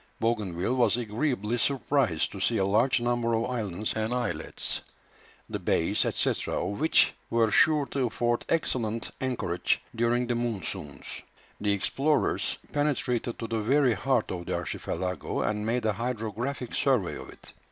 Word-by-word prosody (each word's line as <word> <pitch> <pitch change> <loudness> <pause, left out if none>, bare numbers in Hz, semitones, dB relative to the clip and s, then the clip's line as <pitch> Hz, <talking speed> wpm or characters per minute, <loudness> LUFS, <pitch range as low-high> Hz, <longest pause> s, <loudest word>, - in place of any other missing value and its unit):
Bougainville 105 -3 0
was 120 -2 +4
agreeably 120 0 -1
surprised 135 - +1
to 100 - -7
see 115 +4 +2
a 95 - +2
large 110 +7 +3
number 120 -1 +1
of 115 +1 +1
islands 105 -5 -2
and 110 +1 -1
islets, 125 -1 -1 0.7
the - - -4
bays, - - +1
&c., - - +1 0.2
of 100 +6 -2
which 160 +2 +4 0.2
were 115 -2 +3
sure 150 +5 +5
to 135 -2 -1
afford 120 +1 0
excellent 115 -8 0
anchorage 120 -10 0 0.2
during 120 +2 +2
the 120 - 0
monsoons. 95 - -4 0.4
The 105 -1 +2
explorers 140 +9 +1 0.2
penetrated 125 -5 0
to 115 - -4
the 115 0 -1
very 130 +2 +3
heart 130 -1 0
of 85 -2 -5
the - - 0
archipelago, 90 -1 -3
and 105 0 -1
made 120 0 0
a 110 - +2
hydrographic 120 +3 -3
survey 125 -10 +2
of - - -9
it. - - -15
115 Hz, 150 wpm, -28 LUFS, 105-125 Hz, 0.7 s, sure